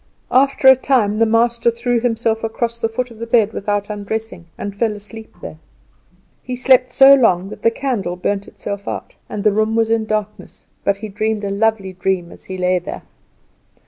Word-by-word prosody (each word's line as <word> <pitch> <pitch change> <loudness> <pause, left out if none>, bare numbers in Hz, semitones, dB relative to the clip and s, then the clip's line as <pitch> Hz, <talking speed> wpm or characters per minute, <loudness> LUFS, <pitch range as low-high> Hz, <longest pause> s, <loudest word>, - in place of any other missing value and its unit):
After 270 +1 +3
a 265 - +10
time 235 -6 +1
the 225 - +4
master 235 +1 +2
threw 235 +1 0
himself 225 -1 -1
across 230 +1 -2
the 225 - 0
foot 250 +2 -3
of 225 - -14
the 230 - -5
bed 225 -2 +3
without 205 0 -2
undressing, 210 -3 -5
and 200 -1 -5
fell 220 +1 0
asleep 210 +2 -10
there. 80 -1 -8 0.8
He 255 - -5
slept 255 0 +4
so 270 +2 +7
long 195 -8 +3
that - - -10
the - - +4
candle 230 -8 -3
burnt 195 +2 -2
itself 200 0 -7
out, - - -5 0.2
and 205 - -4
the 210 - +4
room 215 +2 0
was 225 0 +1
in 225 -1 +1
darkness. 215 -1 -4 0.2
But 200 0 +1
he 215 +2 -6
dreamed 215 +1 -2
a 200 - -2
lovely 200 -2 0
dream 185 -1 -2
as - - -14
he 190 - -6
lay 180 0 +1
there. 175 - -8
220 Hz, 195 wpm, -18 LUFS, 200-235 Hz, 0.8 s, a